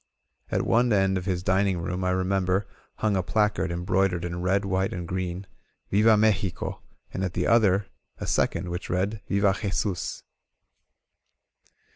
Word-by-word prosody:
At -, -, 0 dB
one 120 Hz, +1 st, +3 dB
end 95 Hz, -2 st, +3 dB
of 90 Hz, -, -9 dB
his 90 Hz, -2 st, -1 dB
dining 95 Hz, 0 st, +2 dB
room, 90 Hz, +2 st, -3 dB
I 90 Hz, -, +1 dB
re 95 Hz, 0 st, +1 dB
member, 95 Hz, +1 st, +1 dB, 0.3 s
hung 110 Hz, -2 st, 0 dB
a 95 Hz, -, +2 dB
placard 105 Hz, -2 st, 0 dB
embroidered 90 Hz, 0 st, 0 dB
in 90 Hz, 0 st, -4 dB
red, 95 Hz, +2 st, +1 dB
white 95 Hz, 0 st, 0 dB
and 90 Hz, -2 st, -5 dB
green: 90 Hz, +1 st, -3 dB, 0.5 s
Viva 110 Hz, +2 st, +5 dB
Mexico!" 105 Hz, -4 st, 0 dB, 0.3 s
and 95 Hz, -, -2 dB
at 95 Hz, -1 st, -3 dB
the -, -, 0 dB
other, 105 Hz, -4 st, +4 dB, 0.3 s
a -, -, -5 dB
second, 90 Hz, -, 0 dB
which 90 Hz, -, -5 dB
read: 100 Hz, +4 st, -1 dB
*Tiva 100 Hz, -1 st, +3 dB
Jesus!" 100 Hz, -3 st, -2 dB
95 Hz, 155 wpm, -26 LUFS, 90-100 Hz, 0.5 s, Viva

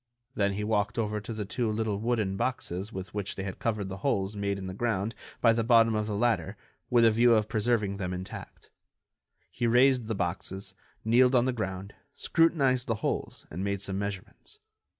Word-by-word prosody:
Then 100 Hz, -1 st, +1 dB
he 105 Hz, +2 st, -3 dB
walked 105 Hz, 0 st, 0 dB
over 105 Hz, -2 st, -1 dB
to 105 Hz, -, -7 dB
the 110 Hz, -2 st, -4 dB
two 115 Hz, +2 st, -1 dB
little 105 Hz, -2 st, -1 dB
wooden 110 Hz, -4 st, 0 dB
boxes 100 Hz, -4 st, -3 dB
with 95 Hz, -1 st, -7 dB
which 100 Hz, -1 st, -3 dB
they 95 Hz, -, -4 dB
had 95 Hz, -1 st, -6 dB
covered 105 Hz, -4 st, -1 dB
the 95 Hz, 0 st, -6 dB
holes 95 Hz, +1 st, -1 dB
made 100 Hz, -1 st, -1 dB
in 95 Hz, -, -6 dB
the 95 Hz, -, -5 dB
ground 110 Hz, 0 st, -1 dB, 0.3 s
by 115 Hz, -2 st, +6 dB
the 115 Hz, 0 st, 0 dB
bottom 115 Hz, -1 st, +5 dB
of 105 Hz, 0 st, -1 dB
the 105 Hz, -, -2 dB
ladder 120 Hz, +2 st, 0 dB, 0.3 s
with 120 Hz, -1 st, +5 dB
a 115 Hz, -, +6 dB
view 120 Hz, +1 st, +5 dB
of 105 Hz, -1 st, +2 dB
preserving 110 Hz, -2 st, 0 dB
them 90 Hz, -2 st, -3 dB
intact. 90 Hz, +1 st, -8 dB, 0.8 s
He 120 Hz, -1 st, -1 dB
raised 125 Hz, 0 st, +4 dB
the 110 Hz, -, -1 dB
boxes, 95 Hz, +1 st, -4 dB, 0.3 s
kneeled 125 Hz, +3 st, +5 dB
on 120 Hz, 0 st, +4 dB
the 130 Hz, -, +1 dB
ground, 95 Hz, -3 st, -4 dB, 0.2 s
scrutinized 135 Hz, -7 st, +2 dB
the 115 Hz, -, +1 dB
holes -, -, -3 dB
and 90 Hz, +4 st, -4 dB
made 100 Hz, 0 st, -1 dB
some 95 Hz, 0 st, -4 dB
measurements. 100 Hz, -2 st, -6 dB
105 Hz, 195 wpm, -29 LUFS, 100-115 Hz, 0.8 s, by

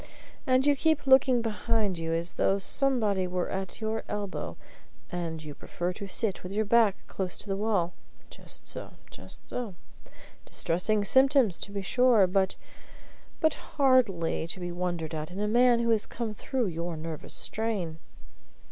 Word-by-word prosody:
And 255 Hz, +1 st, +3 dB
you 290 Hz, -1 st, +5 dB
keep 315 Hz, +1 st, +1 dB
looking 265 Hz, -2 st, +5 dB
behind 215 Hz, -4 st, 0 dB
you, 165 Hz, 0 st, -3 dB
as 165 Hz, +1 st, 0 dB
though 195 Hz, -, +2 dB
somebody 210 Hz, -4 st, +2 dB
were 180 Hz, 0 st, -2 dB
at 190 Hz, -1 st, -4 dB
your 220 Hz, 0 st, -2 dB
elbow; 205 Hz, -2 st, -4 dB, 0.5 s
and 165 Hz, -3 st, -4 dB
you 150 Hz, -1 st, -7 dB
prefer 175 Hz, +4 st, -4 dB
to 200 Hz, -, -7 dB
sit 200 Hz, 0 st, 0 dB
with 180 Hz, -, -8 dB
your 215 Hz, +1 st, +1 dB
back 220 Hz, -2 st, +4 dB
close 185 Hz, -2 st, -4 dB
to -, -, -8 dB
the 195 Hz, -, -1 dB
wall. 195 Hz, -4 st, 0 dB, 0.4 s
Just -, -, -8 dB
so -, -, -7 dB, 0.2 s
just -, -, -13 dB
so. 230 Hz, -7 st, -5 dB, 0.7 s
Distressing 205 Hz, +5 st, +1 dB
symptoms, 265 Hz, -, +4 dB
to 200 Hz, -, -4 dB
be 200 Hz, -1 st, -4 dB
sure, 245 Hz, -1 st, +4 dB
but 190 Hz, +1 st, +1 dB, 0.9 s
but 315 Hz, -2 st, +4 dB
hardly 230 Hz, -, +1 dB
to 175 Hz, -, -4 dB
be 175 Hz, -1 st, -4 dB
wondered 175 Hz, -2 st, -3 dB
at 155 Hz, 0 st, -4 dB
in 185 Hz, +2 st, -7 dB
a 210 Hz, -, 0 dB
man 240 Hz, +2 st, +4 dB
who 235 Hz, 0 st, +1 dB
has 220 Hz, -2 st, +2 dB
come 230 Hz, -3 st, -4 dB
through 250 Hz, +4 st, -2 dB
your 170 Hz, -2 st, -3 dB
nervous 160 Hz, 0 st, -6 dB
strain." 200 Hz, -8 st, -2 dB
200 Hz, 165 wpm, -28 LUFS, 175-235 Hz, 0.9 s, you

